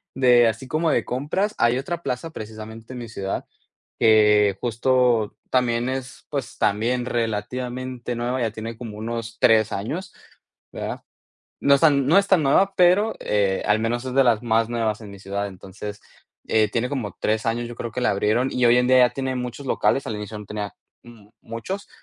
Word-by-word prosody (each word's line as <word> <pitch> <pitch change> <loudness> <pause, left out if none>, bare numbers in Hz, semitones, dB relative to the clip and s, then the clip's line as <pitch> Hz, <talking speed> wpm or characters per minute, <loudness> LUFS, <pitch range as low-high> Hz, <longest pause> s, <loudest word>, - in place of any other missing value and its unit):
de 125 -3 +5
así 115 +4 -3
como 160 +3 0
de - - +1
compras, 160 +12 -1
hay 120 +1 +3
otra 170 +5 -4
plaza 140 +5 -4
precisamente 110 +1 -9
en 125 - -6
mi 115 -2 -7
ciudad, 95 -3 -4 0.5
que, 105 -2 +5
justo, 120 -2 +2
también 120 -1 +1
es 130 0 -5
pues 140 -5 -4
también 120 +5 +1
relativamente 125 +2 -3
nueva, 125 +2 -2
ya 115 -2 0
tiene 110 +1 -7
como 115 -4 -8
unos 115 +1 -5
3 110 -2 +4
años, 160 - -4 0.6
¿verdad? - - -5 0.6
No 140 0 +5
es 140 - +2
tan 140 -4 +4
no 165 - +4
es 200 - +1
tan 180 -5 +4
nueva, 190 +8 +3
pero, 185 +5 +4
eh, 100 -2 +1
al 105 +1 +3
menos 120 +3 -1
es 130 - -4
de 135 - +6
las 115 -3 +3
más 115 -1 +2
nuevas 115 -3 -1
en 105 -2 -10
mi 100 - -11
ciudad. 100 +1 -3
Entonces, 100 +2 -9 0.5
eh, 110 -1 +3
tiene 120 +3 -1
como 120 -9 -4
3 110 +1 0
años, 120 +1 -1
yo 120 - -8
creo 115 - -5
que 125 - -3
la 120 - +2
abrieron, 110 +6 +1
y 125 - +1
hoy 120 - +6
en 125 - +2
día 130 0 +6
ya 125 -1 +6
tiene 130 -1 -3
muchos 125 +2 -5
locales. 135 - +1
Al 110 - -3
inicio 105 +1 -6
no 105 - -10
tenía 105 0 -5 0.3
m 110 -3 -16
muchos, 115 - -6
120 Hz, 195 wpm, -23 LUFS, 110-130 Hz, 0.6 s, de